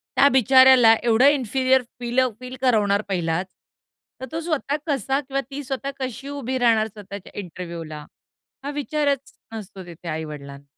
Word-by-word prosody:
त्या 280 - +6
बिचाऱ्याला 260 -2 +7
एवढं 235 +2 +4
inferior 265 -1 +2 0.2
फीलं 250 +1 +1
feel 255 0 -8
करवणार 210 -5 +2
पहिलाच, 175 -1 -1 0.8
तर - - -3
तो 325 - -3
स्वतः 310 -4 -1
कसा 270 -1 0
किंवा 275 0 -3
ती 285 +1 -5
स्वतः 270 +1 -4
कशी 260 +1 -5
उभी 260 -2 -3
राहणार 225 -3 +3
स्वतःच्या 200 -2 -10
इंटरव्ह्यूला? 170 -5 -7 0.6
हा 280 - -4
विचारच 285 -1 -1 0.2
नसतो 200 -3 -8
तिथे 175 0 -11
आई-वडिलांना. 150 -3 -6
250 Hz, 140 wpm, -23 LUFS, 190-270 Hz, 0.8 s, बिचाऱ्याला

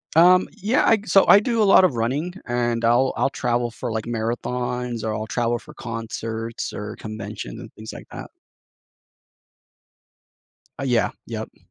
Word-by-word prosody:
Um, 180 +2 +6
yeah. 215 +4 +1
I 225 - +6
so 195 +1 +5
I 200 - +9
do 230 0 0
a - - +5
lot 195 - +7
of 175 -10 +3
running, 140 +10 -1
and 120 -1 0
I'll 120 +3 +3
I'll 135 - +1
travel 120 -2 -1
for, 110 +2 -5
like, 110 -1 -3
marathons, 120 +1 -2
or 110 - -1
I'll 110 +1 -4
travel 120 0 0
for 150 - -14
concerts, 115 -1 -5
or 105 +1 -6
convention 110 - -7
and - - -10
things 110 0 -9
like - - -10
that. - - -8 2.5
Uh, - - -3
yeah. 125 -4 +2 0.2
Yep. - - -6
120 Hz, 160 wpm, -23 LUFS, 115-140 Hz, 2.5 s, I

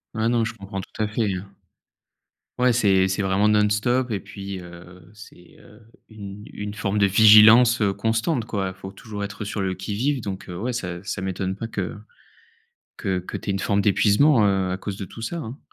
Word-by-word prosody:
Ouais, 110 +1 +1
non, 115 -2 +1
je 115 - -4
comprends 100 -2 -7
tout 110 - -9
à - - 0
fait 105 -3 -1
hein. 95 +2 -7 1.1
Ouais, 125 0 +4
c'est 100 -5 +3
c'est 95 +1 -2
vraiment 95 +2 +2
non-stop 105 +4 +2
et 100 - -2
puis, 100 -1 -8
heu, 90 +1 -13
c'est, 105 -5 -16
heu, 105 +2 -18 0.3
une 105 -2 -10
une 105 0 -5
forme 105 -1 -3
de 100 - +4
vigilance, 110 +3 +7
heu, 100 -1 +2
constante 115 - -1
quoi. 95 -3 -3
Faut 95 +1 -10
toujours 105 0 -8
être, 100 +1 -7
heu, - - -3
sur 105 0 -4
le 95 -1 -1
qui-vive 110 +8 -2
donc 95 -2 -6
heu, 90 - -6
ouais 120 +7 -3
ça 90 -6 -5
ça 95 - -4
m'étonne 95 0 -3
pas 115 - -5
que 100 -3 -4 1.0
que 95 -1 -2
que 90 - -6
tu - - -5
aies - - +1
une 95 - -2
forme 100 0 +1
d'épuisement, 105 +4 +4
heu, 95 -2 +1
à 90 - -1
cause 100 -1 -5
de 100 - -5
tout 115 - -12
ça 140 +10 -4
hein. 130 -2 -7
100 Hz, 210 wpm, -23 LUFS, 95-110 Hz, 1.1 s, vigilance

